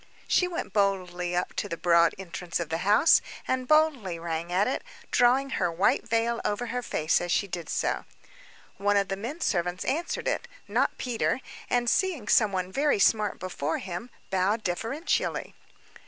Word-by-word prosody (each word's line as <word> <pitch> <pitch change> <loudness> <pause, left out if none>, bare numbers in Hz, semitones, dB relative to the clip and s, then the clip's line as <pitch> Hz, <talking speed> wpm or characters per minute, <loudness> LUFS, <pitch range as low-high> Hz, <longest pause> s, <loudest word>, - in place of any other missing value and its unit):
She 360 - +3
went 350 -1 -5
boldly 180 -3 0
up 180 - -1
to - - -2
the 170 - -3
broad 170 -1 +4
entrance 175 -2 -4
of 170 -2 -3
the 165 0 -1
house, 205 - +5 0.3
and 255 -1 -1
boldly 290 - +3
rang 165 0 -4
at 190 +3 +2
it, 260 - -2 0.3
drawing 260 +2 +3
her 180 -8 0
white 175 +5 +1
veil 230 +1 +1
over 210 +4 -1
her 250 - -1
face 155 -9 +1
as 175 0 -3
she 200 - +1
did 175 -4 -6
so. - - -1 0.7
One 205 +1 +2
of 200 -1 +1
the 195 - -1
men 245 - -6
servants 180 -1 -1
answered 320 +6 -2
it, - - -1 0.2
not - - +1
Peter; 245 +1 -1 0.3
and, 245 -1 +1
seeing 315 - +1
somebody 195 -7 +2
very 290 +4 +2
smart 210 0 +3
before 160 -4 -2
him, 190 +6 -6 0.2
bowed 195 +4 +1
deferentially. 230 - -1
200 Hz, 170 wpm, -27 LUFS, 175-245 Hz, 0.7 s, house